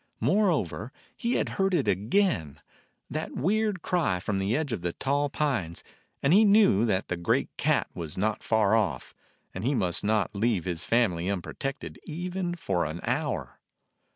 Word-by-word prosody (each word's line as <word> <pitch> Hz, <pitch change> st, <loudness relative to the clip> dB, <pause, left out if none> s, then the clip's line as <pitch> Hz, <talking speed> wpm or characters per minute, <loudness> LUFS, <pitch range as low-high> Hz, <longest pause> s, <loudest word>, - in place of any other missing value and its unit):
Moreover, 150 Hz, -, +1 dB, 0.2 s
he 235 Hz, +1 st, -1 dB
had -, -, +1 dB
heard 195 Hz, -1 st, +2 dB
it 145 Hz, -, +1 dB
again, 100 Hz, -, +1 dB, 0.5 s
that -, -, -4 dB
weird 205 Hz, +3 st, 0 dB
cry 165 Hz, -, +1 dB
from 95 Hz, +2 st, -2 dB
the 100 Hz, +6 st, +1 dB
edge 155 Hz, -4 st, -2 dB
of 105 Hz, -, -3 dB
the 85 Hz, -1 st, -2 dB
tall 145 Hz, +1 st, 0 dB
pines, 125 Hz, -, -1 dB, 0.4 s
and 140 Hz, +4 st, +4 dB
he 210 Hz, +4 st, +7 dB
knew 200 Hz, -, +5 dB
that 95 Hz, -2 st, 0 dB
the 90 Hz, -, -1 dB
great 85 Hz, 0 st, 0 dB
cat -, -, +1 dB
was 80 Hz, -3 st, -6 dB
not 105 Hz, +2 st, 0 dB
far 110 Hz, -2 st, +2 dB
off, 95 Hz, -, -1 dB, 0.4 s
and 95 Hz, -, -5 dB
he 135 Hz, +4 st, +1 dB
must 90 Hz, -6 st, +1 dB
not 105 Hz, 0 st, +1 dB
leave 100 Hz, -3 st, +1 dB
his 85 Hz, -2 st, -3 dB
family 95 Hz, -7 st, +1 dB
unprotected 115 Hz, +8 st, -4 dB
even 175 Hz, +2 st, -3 dB
for 90 Hz, -, -1 dB
an 80 Hz, +3 st, -4 dB
hour. 120 Hz, -, -2 dB
110 Hz, 165 wpm, -27 LUFS, -, 0.5 s, he